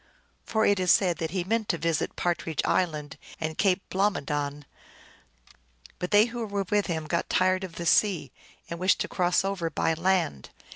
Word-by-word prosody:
For 220 -1 +1
it 205 -1 +3
is 185 -1 +3
said 180 -4 +3
that 160 - -2
he 180 +1 -2
meant 220 +3 -1
to 170 - +1
visit 165 -1 -1
Partridge 170 -3 -1
Island 155 -4 -1 0.2
and 160 -1 -3
Cape 190 0 +1
Blomidon, 145 -7 -1 1.3
but 180 - -3
they 210 +1 +6
who 240 0 -5
were 200 -1 -2
with 205 -1 +2
him 160 -3 -2
had 155 - -12
got 170 - -1
tired 185 +1 +2
of 185 -3 -7
the 170 - -5
sea, 170 - +2 0.4
and 170 - -6
wished 185 +1 +3
to - - -1
cross 180 +1 +1
over 190 -4 -2
by 165 +1 0
land. 165 - 0
180 Hz, 185 wpm, -27 LUFS, 160-195 Hz, 1.3 s, they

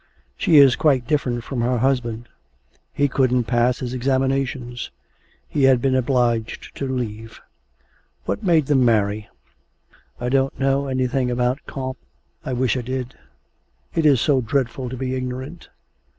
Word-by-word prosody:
She 160 - +3
is 135 -4 +7
quite 135 -6 +2
different 125 -5 -1
from 125 -1 -3
her 125 +1 +1
husband; 120 -2 -1 0.6
he 145 - +1
couldn't 125 -2 +2
pass 120 +1 +1
his 125 -2 -5
examinations; 130 -1 -1 0.6
he 140 -2 +1
had 130 -2 +5
been 130 +1 +1
obliged 120 -3 0
to 140 - -3
leave.... 115 -4 -5 0.9
What - - -2
made 170 -7 +3
them 135 -2 +3
marry? 105 -2 +1 0.9
'I 125 - -2
don't 135 +1 0
know 135 +1 +1
anything 130 -1 0
about 125 +2 0
Comte 130 -2 -5 0.4
I - - -4
wish 125 0 +1
I 130 - -1
did; 130 +1 -4 0.8
it 160 -2 +2
is 140 -4 +5
so 135 0 +2
dreadful 125 +1 -2
to 130 - -6
be 130 0 -3
ignorant. 130 +5 -5
130 Hz, 145 wpm, -22 LUFS, 120-135 Hz, 0.9 s, is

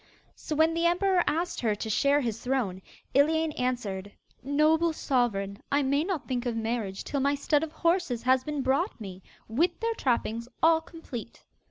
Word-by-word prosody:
So 305 - -5
when 320 +2 +4
the 335 +1 +2
emperor 360 +1 +2
asked 330 +4 -1
her 220 -3 +1
to 215 - -5
share 280 +7 +3
his 230 -4 -2
throne 240 -8 -1 0.3
Iliane 315 +3 +3
answered: 220 -8 -3 0.3
'Noble 310 +4 +2
Sovereign, 225 -8 -1
I 285 0 +3
may 280 +3 +2
not 355 -4 -3
think 250 -1 -2
of 235 - -1
marriage 225 -4 -2
till 280 - -2
my 280 +1 +2
stud 290 +1 +1
of 320 -1 -4
horses 335 -7 0
has 255 +1 +3
been 295 -2 -3
brought 275 - 0
me, 190 -3 -8 0.3
with 335 +10 +1
their 460 0 0
trappings 235 - -1 0.2
all 325 0 +5
complete. 310 -9 -9
280 Hz, 175 wpm, -28 LUFS, 235-320 Hz, 0.3 s, all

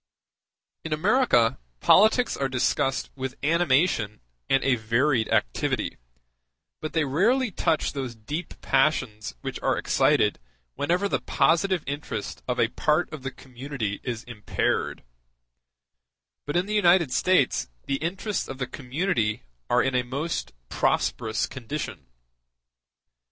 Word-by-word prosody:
In 160 - -2
America 155 - +3 0.2
politics 220 +5 +5
are 135 -1 -1
discussed 130 +1 0
with 130 -1 -4
animation 150 - +2 0.3
and 135 - +3
a 135 - +3
varied 115 +2 +1
activity, - - 0 0.8
but 155 - -5
they 160 -2 +2
rarely 220 - +2
touch 160 -3 0
those 130 -4 -4
deep 145 +11 -6
passions 125 - +1
which - - -5
are - - +1
excited - - +2 0.3
whenever 175 - 0
the - - -1
positive 170 +1 +2
interest 140 -7 -5
of 125 0 -1
a 115 - +3
part 155 +7 0
of 155 - -6
the 135 - -3
community 130 -5 -5
is 120 -2 -4
impaired: 115 -4 -2 1.4
but 145 - -3
in 175 +1 +2
the 210 - -4
United 175 -7 +4
States 135 - +2 0.2
the 135 - 0
interests 190 +7 -2
of 135 - -6
the 130 - -2
community 125 - -1 0.3
are - - +4
in 135 - 0
a 125 - +3
most 135 - -3 0.2
prosperous 110 - 0
condition. 130 - -6
135 Hz, 125 wpm, -26 LUFS, 120-170 Hz, 1.4 s, politics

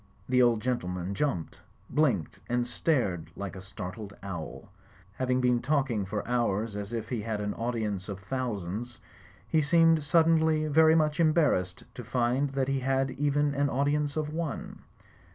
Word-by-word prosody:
The 125 0 +3
old 120 -3 +4
gentleman 90 -7 -2
jumped, 100 - -2 0.3
blinked 125 - 0
and 120 0 +1
stared 120 - 0
like 100 -2 -6
a 95 - -8
startled 95 +2 -7
owl. 85 -5 -7 0.4
Having 130 +2 0
been 125 -1 +2
talking 130 -8 0
for 105 +1 -3
hours 115 -3 0
as 105 +1 -5
if 115 -1 -4
he 120 -4 -2
had 110 -1 -3
an 105 0 -2
audience 110 -5 -3
of 100 - -4
thousands, 120 -1 -4 0.5
he 160 - +2
seemed 165 +1 +4
suddenly 160 0 +3
very 160 +1 +5
much 155 -1 +2
embarrassed 150 - +2
to 125 - -8
find 125 +4 +1
that 135 -1 0
he 135 0 0
had 135 0 0
even 145 +1 +1
an 140 0 +1
audience 145 +2 0
of 150 -1 -2
one. 160 -3 -4
125 Hz, 155 wpm, -29 LUFS, 105-145 Hz, 0.5 s, very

